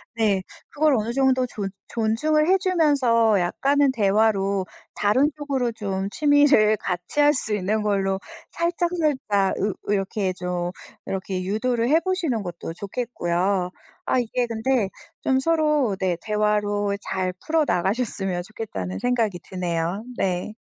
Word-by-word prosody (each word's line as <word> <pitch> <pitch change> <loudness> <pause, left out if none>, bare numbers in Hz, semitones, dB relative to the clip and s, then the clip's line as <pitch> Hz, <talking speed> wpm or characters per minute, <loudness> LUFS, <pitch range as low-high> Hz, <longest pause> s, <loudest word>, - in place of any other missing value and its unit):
네, 210 -4 +2 0.3
그걸 300 -1 +2
어느 225 0 -1
정도 260 0 +2
존 205 -4 -4 0.2
존중을 305 +8 +1
해주면서 285 - +3
약간은 275 +10 +2
대화로 200 -3 +2 0.3
다른 255 +8 +3
쪽으로 270 -5 -1
좀 195 -3 -3
취미를 290 -6 +4
같이 180 +8 -3
할 290 0 +6
수 215 - -2
있는 210 +2 0
걸로 195 -2 0 0.3
살짝살짝 320 - 0
으 205 0 0 0.2
이렇게 195 -1 0
좀 180 -1 -3 0.3
이렇게 190 -1 -3
유도를 230 +4 0
해보시는 330 - +1
것도 170 -2 -6
좋겠고요. 190 -3 -1 0.4
아 - - +2
이게 245 0 -1
근데 230 -1 0 0.3
좀 265 -1 +2
서로 300 -7 +2
네, 185 -2 +1
대화로 210 -1 0
잘 185 -1 -2
풀어 320 0 +2
나가셨으면 195 -1 -1
좋겠다는 175 - -5
생각이 230 -7 0
드네요. 175 +1 -2
네. 185 +3 -1
215 Hz, 275 characters per minute, -24 LUFS, 195-265 Hz, 0.4 s, 할